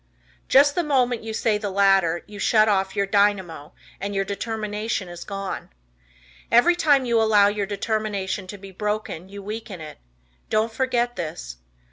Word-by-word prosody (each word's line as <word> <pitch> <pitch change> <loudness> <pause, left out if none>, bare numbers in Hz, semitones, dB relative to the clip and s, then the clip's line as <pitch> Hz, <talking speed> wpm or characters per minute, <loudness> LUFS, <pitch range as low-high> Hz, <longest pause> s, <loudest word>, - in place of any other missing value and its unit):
Just 285 +2 +5
the 350 - +1
moment 250 -5 +1
you 225 - -6
say 220 -1 0
the 205 -1 -3
latter 195 -3 +3
you 205 -1 -11
shut 215 +2 +4
off 195 -2 +1
your 200 - +1
dynamo, 195 -7 0 0.3
and 200 +1 -4
your 195 0 0
determination 210 -1 -3
is 175 0 -8
gone. 195 -1 -5 0.8
Every 245 +10 +5
time 290 -6 +3
you 235 -2 +2
allow 210 -2 +5
your 205 -1 -2
determination 205 -2 -2
to 205 - -8
be 195 0 -11
broken 210 -3 -4
you 200 0 -9
weaken 210 -2 -6
it. 155 -1 -10 0.5
Don't 220 +1 +1
forget 240 -1 0
this. 60 - -6
205 Hz, 160 wpm, -23 LUFS, 195-225 Hz, 0.8 s, Just